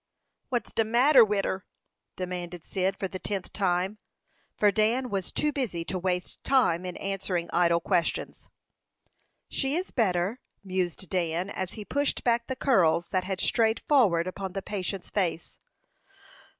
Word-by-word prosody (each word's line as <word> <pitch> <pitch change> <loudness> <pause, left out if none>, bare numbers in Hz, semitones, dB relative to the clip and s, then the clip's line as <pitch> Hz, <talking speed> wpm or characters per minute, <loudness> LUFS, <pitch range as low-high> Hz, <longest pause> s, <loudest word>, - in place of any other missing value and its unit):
"What's 245 -3 -2
de 225 - +3
matter 245 +4 +6
wid 205 -2 +1
her?" 190 0 -2 0.5
demanded 180 -2 -5
Cyd 190 0 -1
for 195 - -2
the 185 0 -7
tenth 195 -2 -4
time, 190 +1 0 0.6
for 205 -1 +4
Dan 230 +5 +1
was 195 -2 -2
too 300 - +1
busy 220 -13 -2
to 185 - -3
waste 180 0 -2
time 185 -10 +2
in 180 - -6
answering 190 -3 -2
idle 170 -1 +4
questions. 170 -1 -1 1.0
"She 270 +1 0
is 365 +3 -2
better," 195 0 +1 0.2
mused 185 -1 -2
Dan, 175 +1 -1
as 185 -1 -4
he 210 -2 -8
pushed 285 +4 0
back 235 -1 +2
the 260 - -3
curls 175 - +3
that 185 -2 0
had 190 -1 -3
strayed 225 -1 +2
forward 200 - +4
upon 185 0 -5
the 195 - -4
patient's 195 -2 -4
face. 175 -5 -1
190 Hz, 150 wpm, -28 LUFS, 180-225 Hz, 1.0 s, matter